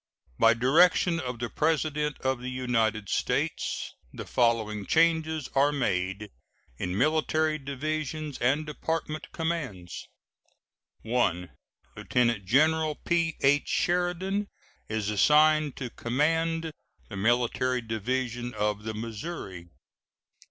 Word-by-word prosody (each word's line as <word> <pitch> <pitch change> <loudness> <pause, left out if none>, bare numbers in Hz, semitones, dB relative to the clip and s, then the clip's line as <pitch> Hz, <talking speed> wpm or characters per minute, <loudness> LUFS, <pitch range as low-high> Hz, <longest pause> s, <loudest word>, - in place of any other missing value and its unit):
By 115 0 +6
direction 165 +7 +4
of 125 -3 -4
the 120 +1 -3
President 150 0 0
of 130 -1 0
the 125 - -4
United 115 -4 0
States, - - -1 0.2
the - - -7
following 110 -4 0
changes 160 -3 +2
are 140 +2 +4
made 100 -6 -2 0.5
in 90 +1 -2
military 155 +3 +1
divisions 155 +1 -4
and 140 +6 +1
department 155 0 -4
commands: 145 - -4 1.0
I. 95 -7 0 0.5
Lieutenant 120 -5 0
General 155 +6 +3
P.H. 160 -5 +1
Sheridan 180 +3 0 0.4
is 105 -1 -1
assigned 150 +6 +4
to 125 -3 -6
command 160 +7 0 0.4
the 105 - -7
Military 120 +3 +1
Division 120 +2 -3
of 105 0 -1
the 110 -1 -4
Missouri. 110 - -6
130 Hz, 100 wpm, -28 LUFS, 115-155 Hz, 1.0 s, By